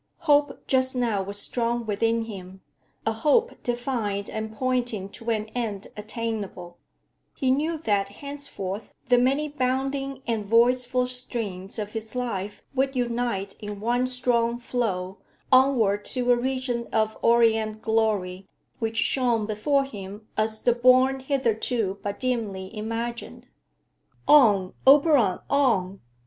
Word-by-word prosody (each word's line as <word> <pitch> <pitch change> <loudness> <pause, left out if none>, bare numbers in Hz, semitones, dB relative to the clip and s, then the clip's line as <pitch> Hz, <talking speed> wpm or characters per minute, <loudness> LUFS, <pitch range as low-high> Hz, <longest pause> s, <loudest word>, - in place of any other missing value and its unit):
Hope 290 -3 +2
just 260 0 +1
now 230 -5 +1
was 200 +1 -5
strong 235 +2 -1
within 225 +2 +1
him, 190 -3 -9 0.4
a 225 - +1
hope 305 - +1
defined 240 -5 -2
and 220 0 -4
pointing 240 -4 -1
to 230 +3 -7
an 215 -2 0
end 215 -5 -3
attainable; 210 -5 -5 0.6
he 260 -1 +1
knew 310 +5 0
that 205 -9 0
henceforth 220 -6 -7
the 245 -1 +6
many 275 +5 +2
bounding 270 0 -2
and 225 -3 -1
voiceful 250 +3 +3
streams 225 -6 -5
of 210 -1 -4
his 220 +1 -6
life 210 -5 -3
would 270 0 0
unite 235 -5 -1
in 205 -1 -6
one 240 +4 +1
strong 240 -2 +1
flow 200 -6 -2 0.3
onward 245 -6 +4
to 250 -1 0
a - - +6
region 250 -1 -2
of 220 0 +1
orient 225 -2 +3
glory 205 -4 0 0.3
which 225 -1 -2
shone 240 -5 +2
before 220 +7 +1
him 205 -4 -9
as 215 0 -1
the 240 - +4
bourne 255 +2 +4
hitherto 235 -6 -1
but 205 0 -4
dimly 220 -6 -3
imagined. 230 +2 -5 0.8
On, 210 -11 +5
Oberon, 275 - +6
on! 200 -10 +1
230 Hz, 130 wpm, -25 LUFS, 210-255 Hz, 0.8 s, the